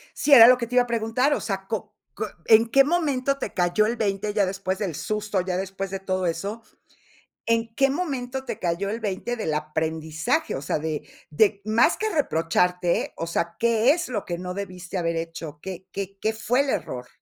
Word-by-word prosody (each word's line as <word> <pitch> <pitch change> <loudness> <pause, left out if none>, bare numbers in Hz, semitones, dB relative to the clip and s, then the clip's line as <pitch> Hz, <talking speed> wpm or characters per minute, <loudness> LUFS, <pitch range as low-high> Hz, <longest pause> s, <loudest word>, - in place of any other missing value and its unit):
Sí, 295 - +3
era 230 -4 +11
lo 250 0 +7
que 235 -1 -3
te 245 - -5
iba 250 - +6
a - - -9
preguntar. 235 +4 +1
O - - -1
sea, 195 -2 -4
¿co 220 - -4 0.2
q - - -3 0.2
en 225 +1 +6
qué 275 +3 +6
momento 280 -4 0
te - - -5
cayó 180 +3 +2
el 230 +2 0
20 205 -1 -1
ya 205 -2 +3
después 190 0 -3
del 190 -7 -2
susto, 210 0 -2
ya 180 0 -2
después 195 +1 -4
de 195 - -3
todo 185 -1 -2
eso? 195 +7 -3 0.8
¿En 230 0 0
qué 270 +2 +3
momento 265 -4 -3
te - - -5
cayó 175 +3 -1
el 220 +3 -3
20 215 +3 -3
del 190 -9 -2
aprendizaje? 155 +1 -1
O 135 - -4
sea, 140 - -1
de 150 -1 -4 0.2
de 200 +6 +2
más 220 +9 +3
que 435 - -1
reprocharte, 180 - +1
o 165 - -3
sea, 170 0 -2
¿qué 235 +2 +4
es 345 -1 -3
lo 215 -5 -3
que 175 - -3
no 180 +1 -5
debiste 185 -1 -6
haber 170 -1 -1
hecho? 165 -2 -6
¿Qué 185 -1 -7
qué 195 0 -5
qué 220 +2 0
fue 240 +4 +1
el 280 - -2
error? 125 - -3
200 Hz, 210 wpm, -24 LUFS, 175-235 Hz, 0.8 s, era